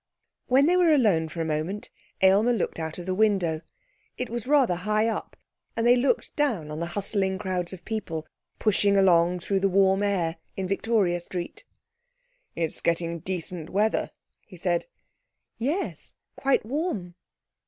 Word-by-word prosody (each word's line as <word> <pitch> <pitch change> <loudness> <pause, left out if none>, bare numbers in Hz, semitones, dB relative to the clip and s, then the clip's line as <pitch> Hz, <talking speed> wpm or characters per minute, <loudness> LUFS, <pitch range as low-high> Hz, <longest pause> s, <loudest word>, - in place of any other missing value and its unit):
When 265 +2 +5
they 350 +3 +4
were 355 -3 +5
alone 200 - +3
for 165 +1 -5
a - - -1
moment 160 +6 -3 0.3
Aylmer 200 +6 +5
looked 210 -6 -2
out 160 -1 -4
of 175 - -7
the 185 - -1
window. 185 -6 +2 0.6
It 250 -2 -4
was 235 0 -4
rather 275 -8 +4
high 215 +4 +1
up, 225 - -4 0.4
and 230 - +1
they 240 +1 +7
looked 265 - 0
down 225 - 0
on 150 - -5
the 170 - -2
hustling 195 -1 0
crowds 185 -3 -2
of 180 -3 -10
people 165 -8 -4 0.3
pushing 200 -1 +3
along 180 -2 +4
through 195 +2 0
the 195 +1 +2
warm 195 +1 +3
air 185 -5 0 0.2
in 190 -1 -2
Victoria 195 -3 +1
Street. 175 - -6 0.9
'It's 165 -2 -1
getting 170 0 0
decent 175 -2 -4
weather,' 210 +3 +1 0.4
he 185 - -13
said. 175 -1 0 0.7
'Yes, 295 +12 -2 0.2
quite 275 -5 +1
warm.' 235 - -3
190 Hz, 155 wpm, -26 LUFS, 175-225 Hz, 0.9 s, they